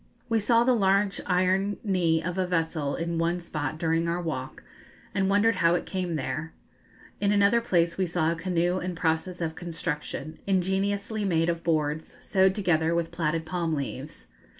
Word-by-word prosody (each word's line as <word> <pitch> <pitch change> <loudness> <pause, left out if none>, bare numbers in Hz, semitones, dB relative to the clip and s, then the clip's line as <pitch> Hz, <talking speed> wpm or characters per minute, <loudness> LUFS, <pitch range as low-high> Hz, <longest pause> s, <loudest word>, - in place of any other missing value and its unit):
We 225 -1 +3
saw 230 +2 +4
the 255 +1 +4
large 200 -2 +2
iron 190 +2 +2
knee 170 -6 +1
of 180 +2 -3
a 185 - +1
vessel 160 -4 -1
in 165 0 -2
one 170 +1 +1
spot 155 -4 -4
during 165 +1 +1
our 170 +1 0
walk, 145 -7 -5 0.5
and 190 0 +1
wondered 205 +1 +3
how 170 -1 +4
it - - -2
came 180 -3 -2
there. 155 +3 -3 0.7
In 200 0 +2
another 205 +3 +4
place 170 -6 +1
we 185 - +2
saw 165 -1 +1
a - - -1
canoe 175 +1 0
in 180 -1 -4
process 165 +2 -1
of 160 -1 -1
construction, 160 -2 -5
ingeniously 200 +3 0
made 165 -3 +2
of 170 -1 -1
boards, 155 -1 -1
sewed 190 -1 +2
together 170 -4 +1
with 170 -1 -1
plaited 165 -1 -1
palm 170 -2 -1
leaves. 140 +1 -5
175 Hz, 175 wpm, -27 LUFS, 160-190 Hz, 0.7 s, saw